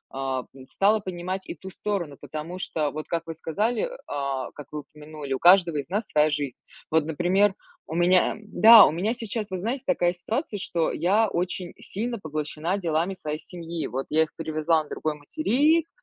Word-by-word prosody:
э, - - -5
м, 130 0 -4
стала 210 +2 +3
понимать 185 -1 -4
и - - -4
ту 190 +4 -10
сторону, 175 -9 -3
потому 165 +4 -6
что, 155 -5 -1
вот 155 +1 -6
как 165 -1 -2
вы 165 - -4
сказали, 220 - -1 0.2
а, 140 -2 -3
как 150 - -11
вы 150 - -4
упомянули, 150 -2 -8
у 130 - -2
каждого 175 -3 +6
из 145 +3 -4
нас 210 +4 -1
своя 150 0 +3
жизнь. 145 -4 -2 0.4
Вот, 160 -1 +4
например, 180 +5 +2 0.3
у 160 - -5
меня... 180 +1 +4
Эм, 215 - -13
да, 220 +1 +9
у - - +2
меня 185 +8 0
сейчас, 225 -2 -4
вы 185 - -2
знаете, 240 +8 -3
такая 175 -10 +2
ситуация, 215 - -3
что 170 -4 0
я 200 +7 +2
очень 180 0 -3
сильно 235 +3 -4
поглощена 155 +2 -3
делами 175 +1 0
своей 150 -3 -4
семьи. 170 -2 -6
Вот 135 +2 -3
я 160 +1 +4
их 155 - -8
привезла 160 0 +1
на 150 - -17
другой 155 -1 -2
материк, 305 - +2
170 Hz, 190 wpm, -25 LUFS, 155-200 Hz, 0.4 s, да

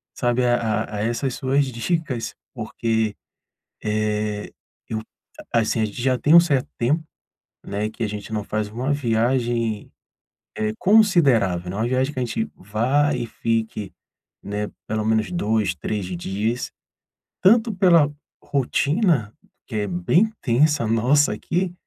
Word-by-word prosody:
sabe, 125 0 +1
a 120 0 +4 0.3
a 105 - -8
a - - -2
essas 120 +4 -1
suas 135 +2 +1
dicas 130 0 -2 0.2
porque, 110 -2 -1 0.7
eh, 105 -1 -1 0.4
eu 110 - -2 0.5
assim, 115 0 +2
a - - +3
gente 105 +3 -7
já 130 0 +2
tem 145 +7 +4
um 170 - +11
certo 140 -7 0
tempo, 145 +7 +1 0.6
né, 105 +2 -2
que 115 +2 -5
a - - +1
gente 105 +1 -6
não 105 -1 -1
faz 105 +1 -2
uma 125 +6 -2
viagem, 120 -3 0 0.7
eh, 110 0 0
considerável, 140 - +4
eh, - - -6
uma 110 +3 0
viagem 130 +3 0
que 130 - -4
a - - +1
gente 115 -1 -2
vá 130 +9 +1
e - - -2
fique, 110 -4 -2 0.5
né, 105 +1 -3 0.2
pelo 110 0 -1
menos 110 +6 +1
2, 110 - 0
3 100 +4 -3
dias, 100 +7 -3 0.7
tanto 225 +3 +5
pela 170 -6 +5 0.3
rotina, 140 - +1 0.3
que 110 - -5
é 105 -1 0
bem 95 - +2
tensa 140 +1 +3
nossa 125 +7 +3
aqui, 180 +1 -2
115 Hz, 145 wpm, -23 LUFS, 105-140 Hz, 0.7 s, um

